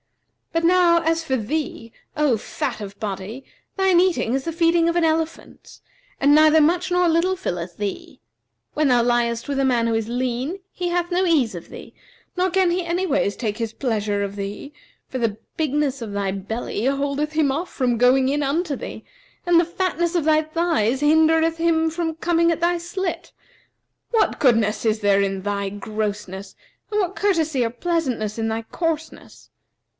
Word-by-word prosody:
But 330 0 0
now, 345 -1 +4
as 330 0 +1
for 265 -4 0
thee, 230 -1 -4 0.2
O 295 -5 +3
fat 215 - -4
of 200 0 -8
body, 210 +5 -5 0.3
thine 380 -2 +4
eating 355 -10 +1
is 270 0 0
the 330 - -2
feeding 335 0 +3
of 335 - -1
an 345 - +2
elephant, 320 0 -3 0.4
and 285 +1 +4
neither 310 +1 +6
much 350 +4 +2
nor 360 0 +3
little 335 +3 +2
filleth 175 - -5
thee. 205 -2 -5 0.5
When 305 -1 +1
thou 245 -2 +4
liest 235 -1 0
with 280 -1 -1
a - - +2
man 245 -3 +2
who 230 - 0
is 225 0 -1
lean, 255 +8 -2
he 355 -1 -3
hath 350 0 -1
no 360 +2 +2
ease 290 - +2
of 170 - -9
thee; - - -11 0.4
nor 365 +1 +1
can 370 -1 +2
he 360 +1 0
anyways 340 - 0
take 215 -2 -3
his 225 -1 -3
pleasure 210 -5 -1
of 200 0 -4
thee; 205 +8 -6 0.3
for 260 - -5
the 225 -3 -1 0.2
bigness 295 -4 -1
of 220 -3 -5
thy 200 -1 -1
belly 205 +3 -4
holdeth 280 +2 -1
him 305 -3 +2
off 330 +6 -3
from 245 -3 0
going 255 +2 +4
in 290 +2 0
unto 295 +2 -1
thee - - -8 0.4
and 350 -1 +5
the - - +4
fatness 345 0 -1
of 335 -4 +1
thy 310 0 +4
thighs 310 -7 0
hindereth 320 +2 +3
him 325 -1 +2
from 325 -1 -2
coming 335 0 +2
at 330 - -1
thy 345 +1 +2
slit. 345 0 -4 0.8
What 450 -2 +1
goodness 225 -5 +2
is 220 -1 +1
there 200 -1 +3
in 195 -1 -2
thy 200 -1 -2
grossness, 205 -1 -5 0.4
and 420 - +1
what 380 -1 -1
courtesy 320 -9 +1
or 230 - 0
pleasantness 245 -6 -2
in 225 - 0
thy 225 +1 -2
coarseness? 320 +5 -5
290 Hz, 180 wpm, -22 LUFS, 225-335 Hz, 0.8 s, neither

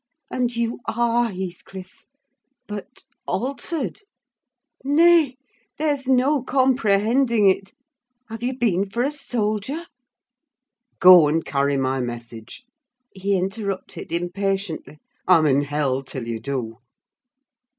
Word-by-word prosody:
And 245 -1 -1
you 235 0 -2
are 235 +1 +1
Heathcliff! 185 0 -8 0.6
But 210 -3 -8 0.2
altered! 275 - -3 0.8
Nay, 305 -1 +4 0.4
there's 290 -3 -1
no 265 +2 +3
comprehending 240 -3 +2
it. 195 0 +2 0.5
Have 225 0 -8
you 250 +1 -2
been 200 -5 +1
for 235 +5 -1
a 280 - 0
soldier?" 245 +2 -3 1.1
"Go 180 -4 +8
and 160 +2 0
carry 140 0 0
my 135 0 0
message," 120 - -7 0.5
he 195 +1 0
interrupted, 195 -1 -4
impatiently. 180 -2 -3 0.3
"I'm 170 -4 +5
in 140 -1 +3
hell 140 -2 -1
till 130 -3 -7
you 115 -1 -3
do!" 115 -2 -4
200 Hz, 105 wpm, -22 LUFS, 160-250 Hz, 1.1 s, Go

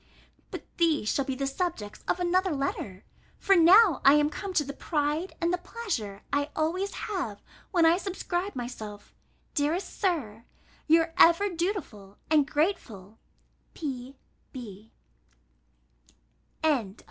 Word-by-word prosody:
But - - -7
these 315 -10 +2
shall 275 - 0
be 265 - -3
the 275 +1 -2
subjects 275 - -4
of - - 0
another 360 -1 +1
letter; 210 -9 -4 0.3
for 390 - +3
now 360 - +6
I 275 - +8
am 295 0 +3
come 395 +4 -5
to 300 - +3
the 280 0 -6
pride 300 +4 -2
and 340 +1 +1
the 360 - 0
pleasure 330 - -5
I 285 +1 +1
always 360 +6 -1
have, 275 - -4 0.3
when 345 -5 +3
I 330 +2 +5
subscribe 375 -1 -3
myself, 215 -4 -7 0.4
dearest 310 +6 -1
Sir, 250 - -1 0.4
your 325 +1 +4
ever 340 +5 +6
dutiful 330 - -4
and 300 -3 +4
grateful 250 - -2 0.6
P.B. 250 - -9
305 Hz, 125 wpm, -28 LUFS, 250-355 Hz, 0.6 s, I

